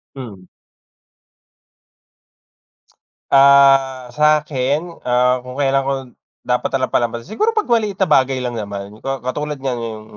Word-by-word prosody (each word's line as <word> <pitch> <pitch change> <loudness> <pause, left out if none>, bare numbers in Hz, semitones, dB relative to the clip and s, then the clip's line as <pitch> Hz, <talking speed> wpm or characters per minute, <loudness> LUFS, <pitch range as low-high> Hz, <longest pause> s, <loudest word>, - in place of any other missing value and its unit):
Hmm. 100 -9 -10 2.8
Ah, 135 -2 +5
sa'kin, 150 +2 0 0.2
ah, 125 +1 +2
kung 125 - -8
kailan 135 -1 0
ko 140 - 0 0.5
dapat 125 0 -1
na 135 - +1
lang 130 - -1
palampasin? 120 - -1
Siguro, 430 - 0
'pag 430 - -2
maliit 220 -4 +1
na 190 - +2
bagay 130 -1 +2
lang 120 -2 -4
naman. 100 -1 -6 0.2
Ka 135 -2 -3
katulad 150 +2 -4
niyan, 130 -2 -2
yung 110 -1 -7
135 Hz, 130 wpm, -18 LUFS, 125-145 Hz, 2.8 s, Ah